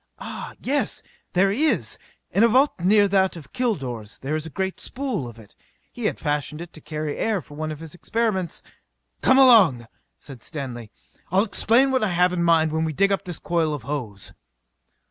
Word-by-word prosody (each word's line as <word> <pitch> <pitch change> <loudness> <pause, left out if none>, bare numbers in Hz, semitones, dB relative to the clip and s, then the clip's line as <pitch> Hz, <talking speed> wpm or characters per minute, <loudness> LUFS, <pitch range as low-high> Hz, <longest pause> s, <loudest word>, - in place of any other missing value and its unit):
"Ah, - - -7
yes! 285 +3 0 0.3
There 195 +2 +3
is! 300 +9 0 0.3
In 205 - +3
a - - +7
vault 260 +3 +3
near 205 +4 +4
that 190 -1 +2
of 150 -5 -12
Kilor's 135 - -2
there 135 +3 -4
is 155 +1 -3
a - - -7
great 190 +3 -3
spool 245 - -3
of 115 -1 -11
it. 110 -3 -16 0.4
He 240 - -6
had - - +1
it - - -22
fashioned 150 +3 -3
to 155 - -11
carry 150 -1 -4
air 220 -3 +1
for 150 - -13
one 155 +1 -4
of 150 - -7
his 165 -2 -8
experiments 190 -2 -2 0.3
" - - -49
"Come 260 - +5
along!" 210 - +6 0.4
cried 135 -5 -10
Stanley. 125 -8 -6 0.4
"I'll 190 +3 +4
explain 230 +5 +3
what 260 -3 +1
I 195 -4 0
have 180 +1 +3
in 175 - -1
mind 165 -2 +3
while 160 +1 0
we 160 -1 -1
dig 200 +6 +2
up 195 - -1
this 175 -3 -5
coil 165 -3 0
of 140 - -8
hose." 120 -8 -5
170 Hz, 200 wpm, -23 LUFS, 145-210 Hz, 0.4 s, a